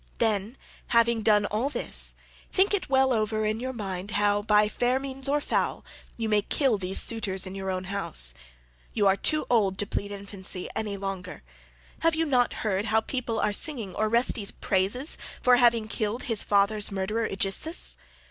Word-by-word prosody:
Then, 220 +1 0 0.3
having 235 -1 +3
done 210 -1 +3
all 220 +7 -1
this, - - +1 0.4
think 395 +2 +3
it 395 -7 -1
well 265 -1 +3
over 215 -1 0
in 215 +1 -1
your 255 +2 -3
mind 195 -5 -5
how, 205 0 +2
by 210 0 +4
fair 245 +4 0
means 270 0 -5
or 295 +1 +2
foul, - - -1 0.3
you 225 -1 -2
may 210 -1 +3
kill 245 0 +1
these 190 0 0
suitors 195 -5 0
in 185 - -7
your 195 0 -4
own 185 0 -2
house. 125 - +2 0.6
You 210 - +1
are 195 -1 +5
too 305 +9 +3
old 200 -6 +2
to 205 - +1
plead 200 0 -4
infancy 200 -2 -7
any 210 -2 -3
longer; 195 - -6 0.6
have 330 -1 +2
you 325 0 +1
not 250 -5 +2
heard 200 -1 0
how 220 0 +2
people 235 -2 -3
are 210 - +1
singing 225 - -2
Orestes' 215 0 +1
praises 205 - 0 0.2
for 250 -1 +5
having 235 -3 +3
killed 220 +2 -2
his 225 -5 0
father's 205 +1 +2
murderer 215 +4 -1
Aegisthus? 200 - -1
215 Hz, 175 wpm, -27 LUFS, 200-245 Hz, 0.6 s, are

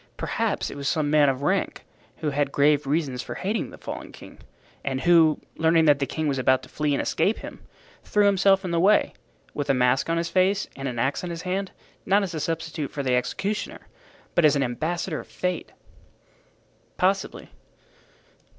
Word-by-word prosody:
Perhaps - - -2
it - - -8
was 140 -1 -4
some 150 0 0
man 150 -2 +5
of 135 +1 -2
rank 190 +5 0 0.4
who 150 - +1
had 140 0 0
grave 145 0 +3
reasons 140 -4 -1
for - - -7
hating 205 +4 -2
the - - -12
fallen - - -7
king, - - -13 0.4
and 135 -1 -2
who, 165 -1 +5 0.2
learning 160 0 +3
that 145 -2 +5
the 140 - -1
king 155 +4 -2
was 135 -2 0
about 130 0 +2
to - - -13
flee 150 -1 -1
and - - 0
escape 210 - +1
him, - - -9 0.4
threw 210 -1 +2
himself 195 -1 +3
in 180 - -3
the 170 - +1
way, 200 +5 +3 0.4
with 145 - -4
a 135 - +4
mask 125 +4 +2
on 165 - +1
his 170 0 -1
face 190 +3 +1
and 135 0 -5
an 125 -2 -4
axe 135 +8 0
in 180 - -4
his 170 0 -6
hand, 190 +1 -2 0.3
not 200 +2 +3
as 190 - -3
substitute 160 -2 -3
for 140 - -4
the 130 -2 +1
executioner, 195 +12 -3 0.5
but 170 - +3
as 150 -1 +5
an 140 - +2
ambassador 160 +6 -2
of - - -10
Fate." 180 -2 -3 1.3
"Possibly." 190 +1 -1
155 Hz, 190 wpm, -25 LUFS, 140-180 Hz, 1.3 s, man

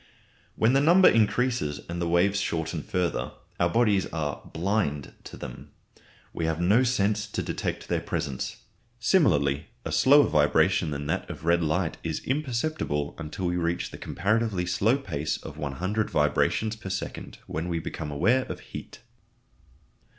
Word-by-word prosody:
When 115 +3 +3
the 135 - +4
number 175 +5 +6
increases 110 - +2
and 85 +1 -4
the 85 - 0
waves 90 +4 +3
shorten 80 -2 -2
further, 90 +1 -2 0.3
our 85 - +3
bodies 105 -1 +2
are 75 -3 -3
"blind" 85 -5 -1
to - - -9
them; - - -9 0.6
we 80 - -2
have 80 0 -1
no 100 +8 +4
sense 105 -4 +1
to 105 - -3
detect - - -3
their - - 0
presence. 70 -3 -4 0.4
Similarly, 75 - +2 0.2
a - - -3
slower 145 +2 +6
vibration 80 +3 +3
than 70 0 -4
that - - -2
of - - -8
red 85 +1 +3
light 80 +2 0
is 80 -2 -3
imperceptible 130 - -1
until 80 +4 -5
we 90 0 0
reach 85 0 -1
the - - -9
comparatively 105 -1 0
slow 105 +8 +2
pace 80 - -3
of - - -10
100 95 +10 -2
vibrations 75 +9 +1
per 100 -3 -8
second, 95 - -5
when 80 +3 -4
we 85 - -1
become 80 -1 -5
aware 115 - +2
of - - -6
heat. - - -9
90 Hz, 155 wpm, -27 LUFS, 80-110 Hz, 0.6 s, number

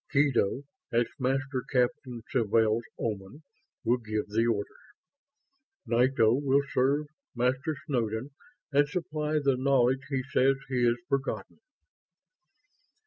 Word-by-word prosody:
Kedo, 140 -4 +2 0.3
as 120 0 +3
Master 135 0 0
Captain 125 -1 0
Sawtelle's 115 -2 +2 0.2
Oman, 110 +7 -4 0.4
will 120 +1 +3
give 110 -2 -3
the 115 +3 +1
orders. 105 -3 -3 0.9
Nito 120 -1 +3
will 140 +1 +2
serve 140 +4 +2 0.3
Master 130 +5 0
Snowden 120 -2 -2 0.4
and 145 +1 +3
supply 155 -2 -3
the 140 -4 +2
knowledge 130 -1 +3
he 135 -2 -1
says 135 +1 +3
he 125 -2 +1
has 120 0 +3
forgotten." 140 +6 -3
130 Hz, 110 wpm, -29 LUFS, 115-140 Hz, 0.9 s, as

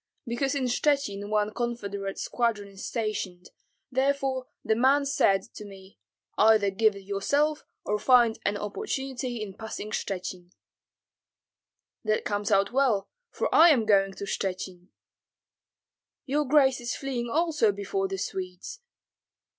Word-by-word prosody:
"Because 265 +4 -1
in 275 - -1
Shchuchyn 245 -6 0
one 210 0 +1
confederate 200 -5 -3
squadron 225 -4 -1
is 195 0 -11
stationed, 210 -6 -4 0.4
therefore 265 -1 0 0.2
the 220 - +3
man 270 +4 +3
said 195 -8 +2
to - - -9
me, 195 - -13 0.4
'Either 215 -2 +5
give 215 +1 +3
it 200 - -10
yourself 285 +10 0 0.2
or 210 0 0
find 240 -2 +4
an 205 0 0
opportunity 255 - -4
in 200 -2 -7
passing 215 0 -7
Shchuchyn.'" 180 -2 -4 1.5
"That 215 -1 0
comes 205 0 -1
out 195 -1 +3
well, 245 -7 +1 0.2
for - - -2
I 335 +2 +8
am 250 -8 +4
going 195 -2 +3
to 200 - -8
Shchuchyn." 185 -2 -4 1.4
"Your 295 +2 0
grace 265 -2 +4
is 240 +1 -3
fleeing 250 -3 -3
also 305 -6 +2
before 195 -1 -2
the 195 0 -4
Swedes?" 185 - -5
215 Hz, 130 wpm, -27 LUFS, 200-260 Hz, 1.5 s, I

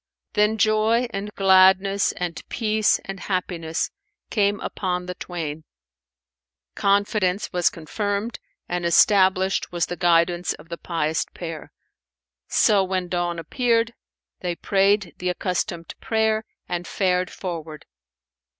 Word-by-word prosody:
Then 210 +1 +2
joy 215 +3 +3
and 200 +1 -4
gladness 190 +1 +5
and 175 -2 -4
peace 215 -2 +2
and 195 -1 -6
happiness 175 -4 -2 0.4
came 205 -2 +2
upon 180 -2 -2
the 180 - -4
twain; 160 -4 -5 1.1
confidence 200 - +1
was 175 -1 +3
confirmed 205 +7 -3 0.3
and 175 0 -2
established 190 +2 +3
was 175 -1 0
the 175 - -5
guidance 175 0 +2
of 165 - -15
the 170 - -5
pious 160 -2 -1
pair. 165 -3 -7 0.8
So 205 -2 +4
when 185 -1 -2
dawn 175 -1 -1
appeared, 230 - +1 0.5
they 175 -1 -3
prayed 195 0 +2
the 180 - -1
accustomed 180 -2 -2
prayer 220 -1 0 0.2
and 175 -1 -3
fared 180 -2 0
forward. 160 -4 -6
185 Hz, 115 wpm, -23 LUFS, 175-205 Hz, 1.1 s, gladness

